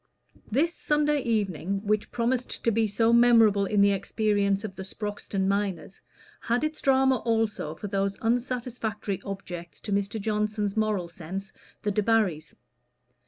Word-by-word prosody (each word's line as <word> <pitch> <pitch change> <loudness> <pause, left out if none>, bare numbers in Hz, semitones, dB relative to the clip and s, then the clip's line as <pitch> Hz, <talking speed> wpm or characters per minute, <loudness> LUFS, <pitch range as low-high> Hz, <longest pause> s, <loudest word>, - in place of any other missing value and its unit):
This 305 +9 +1
Sunday 295 -2 +1
evening, 200 - -1
which 210 0 0
promised 245 +1 -1
to 230 - +3
be 225 0 +2
so 225 +3 +2
memorable 225 -4 +5
in 205 +1 +2
the 200 0 +5
experience 200 0 0
of 210 -3 -5
the 190 - -8
Sproxton 195 0 -3
miners, 195 -2 -2 0.4
had 240 +4 0
its 310 0 -2
drama 265 -1 +4
also 225 -9 -1
for 205 - -8
those 195 0 -1
unsatisfactory 230 -4 -2
objects 175 -5 -7
to - - -6
Mr. 200 +2 -1
Johnson's 210 -1 -1
moral 215 -5 0
sense, 190 +3 -7 0.3
the 210 - 0
Debarrys. 205 -6 +1
210 Hz, 140 wpm, -27 LUFS, 195-230 Hz, 0.4 s, memorable